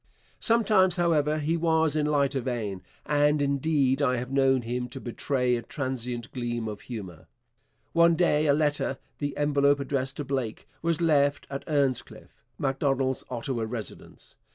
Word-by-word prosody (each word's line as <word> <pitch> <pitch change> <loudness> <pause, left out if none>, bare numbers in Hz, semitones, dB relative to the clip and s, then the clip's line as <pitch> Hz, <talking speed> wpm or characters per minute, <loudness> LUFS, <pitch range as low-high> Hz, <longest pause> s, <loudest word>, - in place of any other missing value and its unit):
Sometimes, 210 -6 +3
however, 155 -3 +2
he 155 +2 0
was 160 -2 +2
in 150 -1 +1
lighter 140 -2 +1
vein, 110 -7 -3 0.2
and, 150 0 +3
indeed, 140 -1 +1
I 130 -3 +2
have 125 +2 -5
known 135 -2 +3
him 125 +1 -3
to 135 +2 -8
betray 125 0 0
a 120 - -3
transient 125 -2 -4
gleam 120 -2 -3
of 105 -1 -6
humour. 100 -9 -8 0.7
One 170 0 +5
day 155 -3 +2
a 140 - +5
letter, 145 -3 0 0.2
the 145 -1 -3
envelope 145 -1 +3
addressed 135 0 -2
to 145 - -4
Blake, 130 -5 -3
was 170 0 0
left 145 -3 +2
at 140 0 -4
'Earnscliffe,' 130 -6 -2
Macdonald's 135 -1 0
Ottawa 120 -1 -3
residence. 110 -2 -9
140 Hz, 150 wpm, -27 LUFS, 125-150 Hz, 0.7 s, One